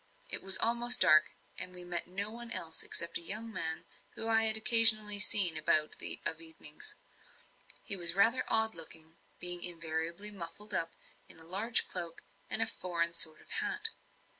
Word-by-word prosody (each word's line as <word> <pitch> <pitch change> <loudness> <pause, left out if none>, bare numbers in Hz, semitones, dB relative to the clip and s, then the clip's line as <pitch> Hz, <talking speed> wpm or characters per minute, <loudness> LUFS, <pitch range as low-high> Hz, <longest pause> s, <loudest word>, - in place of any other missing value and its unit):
It - - -2
was 190 0 +7
almost 240 +3 +6
dark, 155 0 +5 0.3
and 180 0 -8
we 180 - -9
met 175 -1 -4
no 200 +4 -6
one 235 +1 -11
else 165 -7 -4
except 170 0 -4
a - - -6
young 220 +6 -5
man, 160 -4 -5 0.3
whom 225 - -5
I 225 0 +2
had 220 0 +3
occasionally 220 -2 +4
seen 195 -5 +5
about 155 0 +1 0.3
of 160 0 -2
evenings. 160 - -8 0.9
He 200 - +2
was 170 -2 +2
rather 225 +6 +1
odd 220 0 0
looking, 165 0 -9 0.2
being 175 0 -2
invariably 170 +3 -3
muffled 205 +2 -9
up 165 -2 -4 0.3
in - - -9
a 160 - -16
large 200 +8 +1
cloak 170 -2 -8 0.3
and 225 - +2
a - - -3
foreign 170 -6 -4
sort 160 -2 +1
of - - -21
hat. 420 0 -1
185 Hz, 170 wpm, -30 LUFS, 165-220 Hz, 0.9 s, was